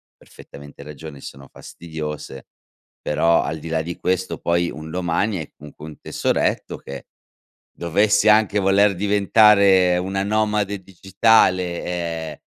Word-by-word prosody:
perfettamente 70 0 -14
ragione, 75 0 -10
sono 70 0 -11
fastidiose, 75 -5 -8 0.6
però, 85 +2 +2
al 80 +2 -4
di 80 - -9
là 80 0 -1
di 85 +2 -7
questo, 95 0 -2
poi, 85 0 0
un 80 +1 -9
domani 90 +3 -1
hai 80 - -8
comunque 75 0 -12
un 75 - -12
tesoretto - - -2
che 70 -1 -10 0.7
dovessi 100 +5 +1
anche 105 -1 +3
voler 100 +1 +3
diventare 100 -2 +4
una 95 +2 -2
nomade 105 -1 -1
digitale, 95 -1 +1
ehm, 85 -3 -4
90 Hz, 125 wpm, -21 LUFS, 80-100 Hz, 0.7 s, diventare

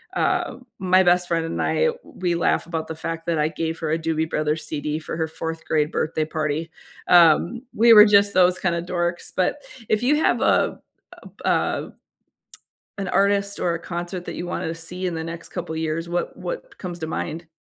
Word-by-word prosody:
uh, 355 -9 0 0.2
my 185 0 +4
best 180 0 +3
friend 165 -1 0
and 165 - -4
I, 480 - +2 0.2
we 175 -2 -2
laugh 170 0 +1
about 160 -2 -3
the - - -4
fact 165 0 -5
that 165 -2 0
I 150 - +3
gave 160 +1 -3
her 160 -2 -2
a 160 - +2
Doobie 160 -1 -1
Brothers 155 0 -1
CD 150 0 -3
for 160 0 -6
her 160 - 0
4th 160 0 -6
grade 150 -1 +1
birthday 155 0 -1
party, 155 0 -2 0.4
um, 175 +7 +5
we 230 +2 +6
were 210 -1 +10
just 200 -1 +4
those 180 0 +4
kinda 170 -2 0
dorks, 175 0 -2
but 185 +9 +1 0.3
if 215 +3 +1
you 295 +4 +3
have - - +2
a - - +2 0.7
uh - - +3
a - - 0 1.1
an 195 - -3
artist 200 +1 +1
or 170 -1 +1
a - - -3
concert 175 +1 -5
that - - -5
you 175 - -5
wanted 170 - -3
to 165 - -3
see 180 +3 -5
in 175 - -2
the 160 0 -4
next 170 +1 -7
couple 175 -3 -5
years, 160 +1 -2
what 175 0 -2
what - - -7
comes 175 -2 -6
to 160 - -3
mind? 160 +1 -4
170 Hz, 200 wpm, -23 LUFS, 160-185 Hz, 1.1 s, were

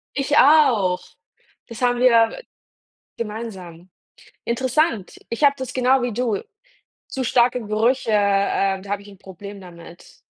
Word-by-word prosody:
Ich 290 +2 0
auch. 250 -12 +4 0.7
Das 230 +1 -10
haben 245 -1 +2
wir 235 - +3 0.8
gemeinsam 190 -6 -8 0.5
interessant. 255 - -1
Ich 235 +6 -2
habe 280 0 +5
das 260 -2 -6
genau 255 0 +2
wie 245 -2 -2
du 225 -3 -1 0.7
zu 260 -1 -4
starke 245 +1 +2
Gerüche, 225 +3 0
äh, 200 -1 +1
da 200 +1 -12
hab 205 0 -2
ich 205 - -15
'n 195 -2 -15
Problem 200 +2 -11
damit. 170 -1 -14
225 Hz, 135 wpm, -21 LUFS, 195-255 Hz, 0.8 s, habe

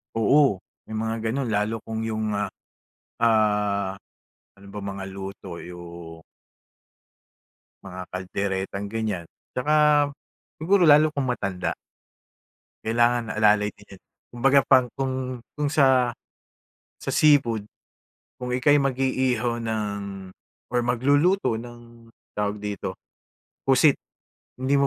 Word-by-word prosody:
Oo, 115 -2 +4 0.3
may 110 - -6
mga 110 +1 -1 0.2
gano'n 130 -2 -2
lalo 105 +2 0
kung 110 0 -4
'yong, 110 -1 -2
ah, 105 - -1 0.7
ah, 105 -3 +2 0.6
ano 100 0 -16
bang 100 -1 -6
mga 95 -1 -6
luto 95 -2 -8
'yong 85 -2 -10 1.6
mga 90 -1 -7
kalderetang 95 +1 -3
ganiyan. 110 -6 -3 0.3
'Tsaka 145 +5 0 0.9
siguro 185 +2 +4
lalo 150 +1 +7
kung 140 -3 -1
matanda. 100 -6 -2 1.1
Kailangan 120 +1 +2
alalay 105 -1 +4
din 105 - -16
'yon, - - -34 0.3
kumbaga 135 +3 +4
pang 130 -2 +6
kung 135 -1 -1 0.4
kung 145 -1 0
sa 130 -3 +4 0.9
sa - - -2
seafood, 125 -8 +4 0.7
kung 125 0 -5
ika'y 145 +3 +4
mag-iihaw 130 -3 0
ng 110 -1 -1 0.9
or 125 - +2
magluluto 140 - +2
ng 120 0 -11 0.3
tawag 105 0 -1
dito, 105 -1 -4 0.7
pusit 135 +2 +5 0.7
hindi 135 +2 +1
mo 140 - +3
115 Hz, 110 wpm, -25 LUFS, 100-130 Hz, 1.6 s, lalo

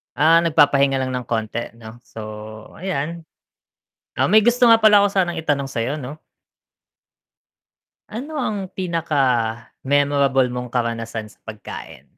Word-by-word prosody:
Ah, 155 +5 +5
nagpapahinga 140 -4 +3
lang 130 - -2
ng 125 -1 -4
konti, 115 +1 -3
'no, 115 0 -12
so, 110 - -10 0.6
ayan. 170 -2 -4 0.9
Ah, - - +3
may 215 +3 +5
gusto 240 +2 +4
nga 230 - +8
pala 215 -2 +6
ko 200 - +4
sanang 185 -4 -1
i-tanong 145 -4 -1
sa'yo, 115 +5 -2
'no? 145 +1 -8 1.9
Ano 275 +8 -6
ang 210 -8 -2
pinaka-memorable 140 -3 0
mong 125 0 -5
karanasan 115 -2 -3
sa - - -25
pagkain? 110 -1 -9
140 Hz, 125 wpm, -21 LUFS, 120-180 Hz, 1.9 s, nga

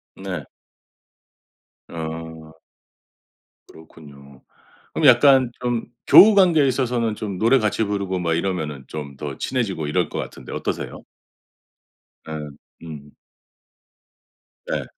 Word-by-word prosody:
네. 95 -5 -6 1.4
어. 80 -1 -8 1.1
그렇군요. 70 -4 -16 0.5
그럼 155 - +3
약간 130 0 +6
좀 120 -2 -1 0.2
교우 210 +1 +9
관계에 170 -7 +5
있어서는 120 -4 0
좀 100 -3 -5
노래 120 +6 +4
같이 110 0 0
부르고 100 -3 -2
뭐 85 -2 -1
이러면은 80 -6 -3
좀 75 -3 -7
더 70 -2 -6
친해지고 100 - -2
이럴 75 - 0
것 - - -6
같은데 - - -8
어떠세요? - - -5 1.2
예. 75 -2 -6 0.4
음. 75 -2 -10 1.6
네. - - -2
90 Hz, 210 characters per minute, -22 LUFS, 80-120 Hz, 1.6 s, 교우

